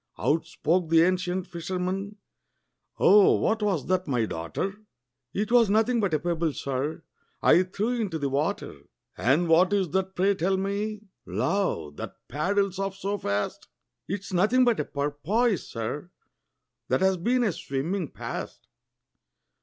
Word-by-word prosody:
Out 160 +2 +1
spoke 165 +2 0
the 165 0 +6
ancient 180 0 0
fisherman, 185 +3 -4 0.8
"Oh, 205 -1 +6
what 220 0 0
was 195 -8 0
that, 185 -1 0
my 125 -5 +1
daughter?" 85 - -3 0.6
"'T 210 - -1
was 235 -4 +5
nothing 225 +4 +3
but 195 -7 +1
a - - +1
pebble, 165 -1 -1
sir, 140 +5 -3 0.4
I 175 - +6
threw 215 +6 -1
into 185 -7 -2
the 145 -2 -1
water." 140 +2 -2 0.3
"And 150 +8 +2
what 175 +4 +5
is 195 -4 +1
that, 190 0 -1
pray 195 +2 +3
tell 190 +1 0
me, 205 +2 -2 0.3
love, 85 - -1
that - - -6
paddles 195 +7 0
off 195 -1 -2
so 200 +1 -3
fast?" 100 0 -2 0.4
"It's 195 0 -5
nothing 215 +8 +4
but 240 -2 +2
a 150 - 0
porpoise, 160 +10 -1
sir, 125 +9 -4 0.8
that - - +1
's 190 -1 +3
been 245 +8 +1
a 215 - +2
swimming 160 +4 -3
past." - - -7
185 Hz, 145 wpm, -26 LUFS, 155-200 Hz, 0.8 s, the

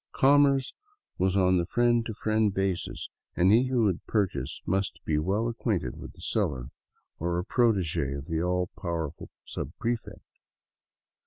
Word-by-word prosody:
Commerce 140 -1 +4 0.5
was 95 +1 +2
on 90 -1 +4
the 85 - 0
friend 120 +1 +3
to 110 - -5
friend 110 -1 +1
basis, 95 -2 -2 0.3
and 90 +3 +4
he 120 +4 +5
who 125 -3 +2
would 95 -5 +1
purchase 90 - -1
must 95 +1 -1
be 75 -1 +1
well 100 +8 0
acquainted 110 - -1
with - - -9
the - - -16
seller, 60 -2 -1 0.5
or 85 +1 -1
a 90 - -2
protege 95 - +1
of 70 0 -6
the 80 -1 -1
all 90 0 0
powerful 85 -4 -4 0.2
subprefect. 115 - -4
95 Hz, 150 wpm, -28 LUFS, 85-115 Hz, 0.5 s, he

